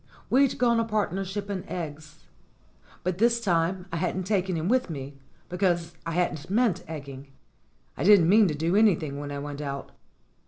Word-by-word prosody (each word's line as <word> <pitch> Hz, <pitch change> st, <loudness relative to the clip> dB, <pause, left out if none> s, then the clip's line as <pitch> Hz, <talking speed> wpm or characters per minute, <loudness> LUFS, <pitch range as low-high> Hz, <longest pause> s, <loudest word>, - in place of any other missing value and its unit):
We'd 270 Hz, +1 st, +3 dB
gone 235 Hz, -2 st, +3 dB
a -, -, +2 dB
partnership 200 Hz, -2 st, -2 dB
in 195 Hz, -3 st, -4 dB
eggs. 155 Hz, -3 st, -7 dB, 0.8 s
But 185 Hz, 0 st, -2 dB
this 235 Hz, +1 st, +3 dB
time 180 Hz, -3 st, 0 dB
I 170 Hz, -, -2 dB
hadn't 180 Hz, +2 st, -1 dB
taken 190 Hz, -2 st, 0 dB
him 160 Hz, +2 st, -2 dB
with 250 Hz, -1 st, +2 dB
me, 140 Hz, -2 st, -7 dB, 0.3 s
because 175 Hz, -2 st, 0 dB
I 165 Hz, -, -2 dB
hadn't 165 Hz, -3 st, -1 dB
meant 205 Hz, -4 st, +1 dB
egging. 140 Hz, -3 st, -8 dB, 0.7 s
I -, -, -4 dB
didn't 195 Hz, -3 st, +6 dB
mean 210 Hz, +3 st, +6 dB
to 155 Hz, -, -1 dB
do 165 Hz, +5 st, 0 dB
anything 165 Hz, -10 st, +2 dB
when 145 Hz, 0 st, -6 dB
I 140 Hz, -, -4 dB
went 145 Hz, 0 st, -6 dB
out. 140 Hz, -1 st, -5 dB
180 Hz, 170 wpm, -26 LUFS, 155-205 Hz, 0.8 s, didn't